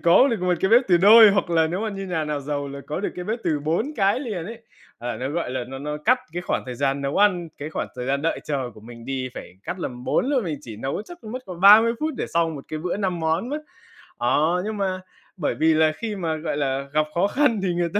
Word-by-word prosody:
có 175 +11 +6
được 225 -6 -1
một 180 -1 +2
cái 190 - +2
bếp 240 +3 +7
từ 175 - +6
đôi, 215 +4 +8
hoặc 200 -2 0
là 165 -1 +3
nếu 175 +4 -3
mà 220 - -1
như 195 -2 -5
nhà 165 -4 -1
nào 150 -1 -2
giàu 145 0 -3
là 140 0 -7
có 150 - -3
được 205 - -1
cái 180 - -6
bếp 220 +5 -2
từ 150 -2 0
4 170 - -1
cái 200 +5 +2
liền 210 - -4
ấy. 230 +1 -9 0.4
Ờ, 120 0 -4
nó, 130 +2 -3
gọi 165 -3 -2
là, 130 -1 -3
nó 135 0 -7
nó 150 +1 -4
cắt 250 +3 +4
cái 175 +1 -4
khoảng - - -1
thời 125 - -5
gian 140 +2 0
nấu 140 +1 -2
ăn, 180 -5 +3
cái 150 +2 -6
khoảng - - -3
thời 125 0 -4
gian 140 +1 0
đợi 165 - -1
chờ 135 -5 -2
của - - -14
mình 115 +1 -12
đi, 130 -1 -3
phải - - -9
cắt 185 - -5
làm 125 -6 -6
4 - - +1
luôn, 265 -6 +1
mình 155 -5 -3
chỉ 115 -7 -9
nấu 135 - -3
chắc 345 +9 -12
còn 215 - -8
mất 255 0 -5
còn 180 -2 -8
30 215 +4 +8
phút 310 0 -1
để - - -2
xong 165 -1 0
1 140 - -8
cái 155 - -4
bữa 175 +4 -2
5 185 -4 -2
món 160 +9 0
á. 295 - -2 0.6
Ờ, 155 +9 +2
nhưng 215 0 -3
mà 190 -2 -1 0.4
bởi 160 - -1
vì 160 0 +3
là 155 0 +4
khi 220 -3 -4
mà, 165 -4 -2
gọi 155 -2 -3
là, 135 -1 -1
gặp 155 0 +3
khó 185 +3 +3
khăn 250 -2 +2
thì 180 -2 0
người 175 0 0
ta 205 - +2
170 Hz, 285 wpm, -23 LUFS, 145-205 Hz, 0.6 s, đôi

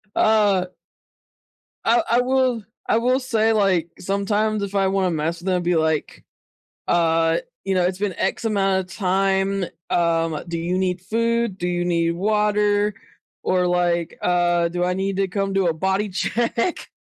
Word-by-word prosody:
Ah. 205 -4 +3 1.2
I 235 +1 +3
I 240 +2 +4
will 255 -3 +1 0.2
I - - +3
will 255 +2 +2
say, 225 -4 +1
like, 185 -5 +2
sometimes 205 +2 0
if 200 0 -5
I 195 -1 +3
wanna 190 -1 +1
mess 165 +1 -2
with 175 - -9
them, 185 - +2
it'd 180 - -1
be 175 0 +1
like, 160 -1 -1 0.6
uh, 165 -1 +2 0.3
"You 195 - -1
know, 180 - +2
it's 180 +1 0
been 200 -2 -2
X - - -1
amount 195 -3 +1
of - - -10
time, 195 0 +1 0.2
um, 165 -2 0
do 170 -1 -3
you 175 +2 -1
need 180 -1 -1
food? 230 0 0
Do 175 - -3
you 175 0 -1
need 170 -1 +1
water, 210 +2 +1 0.5
or, 180 -1 +1
like, 175 -1 0
uh, 175 -1 +2
do 175 +1 -2
I 180 0 +1
need 195 +1 -2
to 195 -1 +1
come 195 +1 -2
do 195 -2 +2
a 165 - +1
body 190 +5 -1
check?" 230 - -1
190 Hz, 170 wpm, -22 LUFS, 175-210 Hz, 1.2 s, I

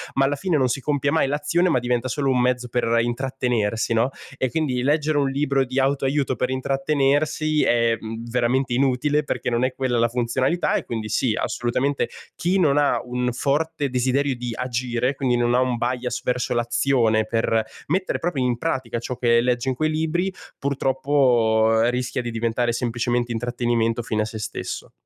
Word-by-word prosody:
Ma 135 - +3
alla 145 +1 0
fine 165 +2 0
non 130 -3 +2
si 130 +3 -2
compie 140 0 0
mai 160 -3 +2
l'azione, 150 +5 +1
ma 155 - +3
diventa 125 +1 -1
solo 135 +1 0
un 125 - +2
mezzo 125 0 +1
per 120 +1 -1 0.2
intrattenersi, 120 -3 -1
no, 115 +3 +2 0.3
e 130 - 0
quindi 135 -4 -1
leggere 150 +3 +1
un 140 -1 +1
libro 140 0 +1
di 130 +2 -2
auto-aiuto 135 0 +1
per 125 +2 -1
intrattenersi 140 +3 +1
è, 115 -1 +3
mhmm, 115 +1 -6
veramente 125 +1 +1
inutile, 140 +3 +1
perché 145 - -2
non 120 +1 +1
è 130 0 0
quella 130 -3 0
la 115 - +4
funzionalità. 125 +7 0
E - - 0
quindi 110 -2 -4
sì, 110 +2 +1
assolutamente, 125 +4 -1 0.3
chi 180 +3 0
non 145 -5 +3
ha 145 -1 +3
un 125 0 -2
forte 145 +3 -1
desiderio 130 +2 +1
di 120 0 -5
agire, 125 0 -1
quindi 130 -2 +1
non 120 0 +1
ha 125 - +4
un 125 -2 0
bias 125 0 -2
verso 125 0 -1
l'azione, 120 -2 +2
per 115 0 +1 0.2
mettere 185 +5 0
proprio 165 -6 -1
in 125 -1 0
pratica 130 -5 -2
ciò 125 +2 -5
che 115 -1 +3
leggi 125 +1 0
in 130 - -1
quei 155 +4 0
libri, 160 +4 -1 0.2
purtroppo 130 -5 +2
rischia 125 +1 -2
di 120 - -4
diventare 115 +1 0
semplicemente 120 0 -1
intrattenimento 120 -1 0
fine 110 -2 -1
a - - -3
sé 110 0 -6
stesso. 105 - -5
125 Hz, 180 wpm, -23 LUFS, 120-140 Hz, 0.3 s, la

